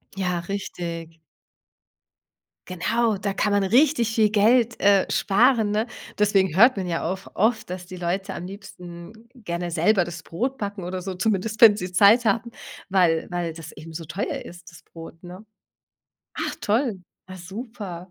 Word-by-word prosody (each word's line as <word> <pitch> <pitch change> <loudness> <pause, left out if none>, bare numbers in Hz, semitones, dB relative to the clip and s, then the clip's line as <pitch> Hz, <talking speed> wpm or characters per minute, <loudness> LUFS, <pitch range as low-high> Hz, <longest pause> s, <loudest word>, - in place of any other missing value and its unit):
Ja, 180 -2 -1
richtig. 170 -3 -6 1.5
Genau, 215 +4 0
da 200 0 -3
kann 210 +1 0
man 200 -1 +2
richtig 240 +1 +3
viel 215 -2 +3
Geld, 230 +3 +3
äh, 200 -1 +4
sparen, 220 +1 +3
ne? 215 +3 0 0.3
Deswegen 195 -4 +2
hört 235 +3 +6
man 185 - -2
ja 170 -2 -2
auch 190 +1 -7
oft, 220 -1 +1
dass 180 -1 -6
die 185 - -9
Leute 180 +2 -3
am 175 - -6
liebsten 180 -1 -10 0.2
gerne 175 -7 -5
selber 180 +4 +3
das 170 -1 -7
Brot 255 +13 -3
backen 200 -3 -5
oder 180 +1 -4
so, 185 0 -5
zumindest 215 +2 -1
wenn 210 -3 +9
sie 180 -2 -5
Zeit 210 +6 +5
haben, 235 +2 0 0.4
weil 175 -4 +2
weil 175 -2 -2
das 165 -1 -10
eben 160 +1 -11
so 165 0 -6
teuer 190 +6 -4
ist, 175 0 -12
das 170 - -16
Brot, 165 0 -12
ne? 180 +5 -11 0.9
Ach - - -3
toll, 215 -3 0 0.3
ja, 185 - -9
super. 190 -2 -8
195 Hz, 160 wpm, -24 LUFS, 175-215 Hz, 1.5 s, wenn